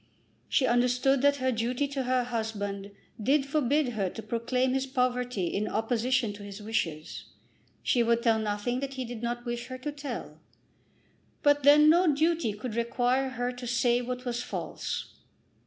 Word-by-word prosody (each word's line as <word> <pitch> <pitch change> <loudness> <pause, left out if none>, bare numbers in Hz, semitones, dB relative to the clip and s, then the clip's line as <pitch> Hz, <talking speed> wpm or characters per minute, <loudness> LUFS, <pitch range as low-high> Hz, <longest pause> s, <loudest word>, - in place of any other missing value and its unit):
She 270 - +3
understood 250 +2 +3
that 285 0 +4
her 260 -2 0
duty 245 +4 -1
to 270 -2 -3
her 255 0 +2
husband 205 -4 -3 0.3
did 270 +5 +3
forbid 290 -1 +1
her 205 -5 -1
to 220 - -8
proclaim 250 +3 0
his 270 0 0
poverty 250 -5 0
in 200 +5 -1
opposition 235 +1 0
to 205 - -11
his 200 0 -8
wishes. 170 -8 -3 0.6
She 245 - +2
would 235 0 +2
tell 225 -2 +3
nothing 215 +3 -1
that 275 0 -4
he 260 -1 -3
did 235 -1 -7
not 240 +1 -3
wish 240 0 -4
her 255 0 -6
to 295 +3 -4
tell, 285 -1 -7 1.0
but 290 0 +4
then 295 +2 +7
no 340 +1 +5
duty 320 -5 +1
could 215 +3 -6
require 245 +3 +1
her 245 -1 -2
to 250 0 -8
say 240 0 +2
what 250 +1 -5
was 240 -1 -2
false. - - -5
245 Hz, 170 wpm, -28 LUFS, 230-265 Hz, 1.0 s, then